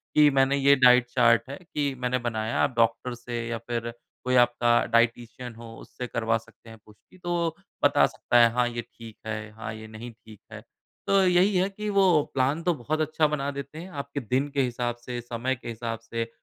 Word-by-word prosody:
कि 150 -1 +7
मैंने 135 0 +3
ये 140 0 +5
डाइट 125 -2 +5
चार्ट 120 -2 +4
है 140 - -6 0.2
कि 145 -2 0
मैंने 125 0 0
बनाया, 115 -2 -2
आप 130 - 0
डॉक्टर 115 +2 +1
से 120 -1 -5
या 120 0 -3
फिर 120 0 -2 0.3
कोई 125 0 +1
आपका 120 -1 +4
डायटीशियन 120 +1 0
हो 115 0 -11
उससे 125 - -8
करवा 115 -1 0
सकते 115 0 -17
हैं 110 - -12
पुष्टि, 105 - -21
तो 175 -2 -2 0.3
बता - - +5
सकता 120 - 0
है 115 -1 +6
हाँ, 125 0 +2
ये 120 0 -4
ठीक 115 -1 -14
है 110 -1 -5
हाँ, 110 0 -7
ये 110 0 -9
नहीं 110 +2 -9
ठीक 110 -2 -16
है। - - -8 0.5
तो 195 0 +4
यही 185 +2 +3
है 185 +1 +3
कि 210 +2 -5
वो 195 -1 +5 0.3
प्लान 135 +5 +1
तो 175 - +2
बहुत 155 +3 -2
अच्छा 155 0 +1
बना 145 -2 -2
देते 140 +2 -8
हैं 175 +4 -8
आपके 140 0 -4
दिन 130 +3 -1
के 140 - +2
हिसाब 120 -1 -2
से, 120 0 -7
समय 120 +2 -3
के 120 - -12
हिसाब 115 0 -4
से। 115 0 -4
120 Hz, 210 wpm, -26 LUFS, 115-140 Hz, 0.5 s, कि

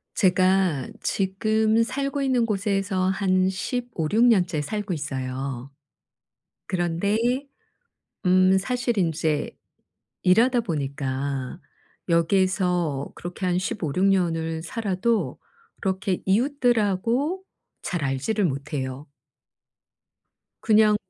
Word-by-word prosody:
제가 185 - +2
지금 215 +3 +1
살고 275 +4 -2
있는 255 -3 +2
곳에서 195 -3 0
한 190 -1 +2
15-16 220 0 -1
년째 180 -10 +3
살고 205 +4 -3
있어요. 135 -3 -4 1.0
그런데 175 +3 0 1.1
음 185 +1 +5
사실 245 +3 -1
인제 160 -4 0 0.7
일하다 235 +7 +4
보니까 140 - -3 0.5
여기에서 175 -4 +1
그렇게 175 +2 -5
한 180 0 +1
15-16 185 -1 -1
년을 165 -4 +1
살아도 195 - -1 0.4
그렇게 190 -1 -1
이웃들하고 240 - +1 0.4
잘 175 -5 -3
알지를 140 +11 0
못해요. 140 -2 -3 1.5
그냥 215 -1 +4
185 Hz, 180 characters per minute, -24 LUFS, 160-215 Hz, 1.5 s, 음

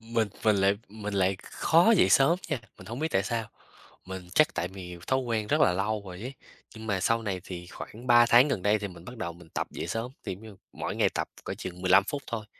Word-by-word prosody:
mình 115 -1 0 0.2
mình 110 -2 +5
lại 100 +1 +4
mình 105 0 -6
lại 95 0 +2
khó 170 +8 +4
dậy - - +5
sớm 160 +6 +5
nha, 145 -7 -1 0.2
mình 95 - -12
hổng 115 +4 -5
biết 160 - 0
tại 95 - +2
sao. 115 +1 -2 0.6
Mình 95 -1 -7
chắc 155 - +4
tại 90 - -1
vì 90 -2 -9
thói 130 - +2
quen 115 -4 -1
rất - - +1
là 90 - +5
lâu 105 +3 -1
rồi 90 0 -8
ấy, 130 +5 -6 0.4
nhưng 110 0 -9
mà 100 -3 0
sau 115 +4 +2
này 95 -4 -2
thì 90 -2 -7
khoảng 115 +7 -9
3 120 -1 +7
tháng 125 +5 +7
gần 100 -9 -1
đây 105 +1 +3
thì 100 - -4
mình 90 -2 -12
bắt 125 +3 -9
đầu 90 -6 -4
mình 85 -1 -16
tập - - -2
dậy - - -5
sớm. 115 +3 -3
Thì, - - -3
giống 100 - -15
như, 110 -3 -11 0.2
mỗi - - -4
ngày - - +4
tập - - -1 0.2
cỡ - - -4
chừng 90 0 -7
15 95 +1 +6
phút 140 +5 -4
thôi, 115 -3 -4
105 Hz, 255 wpm, -28 LUFS, 95-120 Hz, 0.6 s, 3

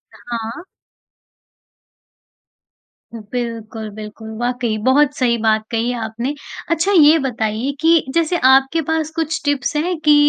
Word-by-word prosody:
हाँ। 230 +3 -6 2.5
बिल्कुल, 225 0 -5
बिल्कुल। 215 +1 -9
वाक़ई 245 -2 -1
बहुत 290 +2 +4
सही 240 -2 +2
बात 220 -1 +2
कही 230 +1 0
है 245 - -3
आपने। 230 +5 -3 0.4
अच्छा 335 +4 +1
ये 320 -4 +6
बताइए 240 -1 -2
कि 325 0 +4
जैसे 335 +1 +2
आपके 270 +4 +4
पास 320 -1 0
कुछ 320 -1 -2
टिप्स 285 -1 0
हैं 340 +4 0
कि, 300 - +8
250 Hz, 125 wpm, -19 LUFS, 225-310 Hz, 2.5 s, कि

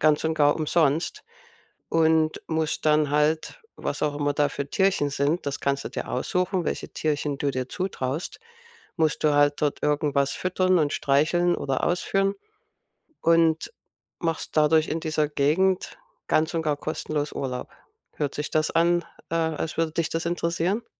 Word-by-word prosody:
ganz 155 0 +3
und 160 0 +1
gar 145 -2 +3
umsonst 160 - +1 0.7
und 160 -1 +2
musst 160 -1 -1
dann 150 -1 +3
halt 155 - +1 0.2
was - - -4
auch 150 -1 0
immer 145 0 0
da 145 0 +2
für 140 0 -4
Tierchen 190 -7 +2
sind, 145 +4 0
das 140 0 -3
kannst 140 0 -1
du - - -3
dir - - -5
aussuchen, 180 +8 -1
welche - - -3
Tierchen 150 -2 -2
du 140 - 0
dir 130 -1 -3
zutraust, 160 -5 -3 0.6
musst 160 -3 +1
du 150 - +4
halt 145 0 +3
dort 145 -1 0
irgendwas 145 -2 +1
füttern 185 0 +1
und 145 -2 +1
streicheln 165 +5 +2
oder 135 -2 -1
ausführen 195 +2 +1 0.9
und 165 - +3 0.5
machst 165 -2 -3
dadurch 155 +1 +4
in 165 - -2
dieser 155 -2 0
Gegend 175 - +1 0.3
ganz 155 +2 +2
und 165 - 0
gar 150 -2 0
kostenlos 150 -1 -3
Urlaub. 125 -2 -4 0.5
Hört 145 -2 -2
sich 150 - -3
das 155 -1 +2
an, 170 +1 +3 0.3
äh, - - -2
als 160 -1 -1
würde 165 -1 +1
dich 160 -1 -1
das 165 +1 -2
interessieren? 175 +5 -1
155 Hz, 160 wpm, -25 LUFS, 145-170 Hz, 0.9 s, du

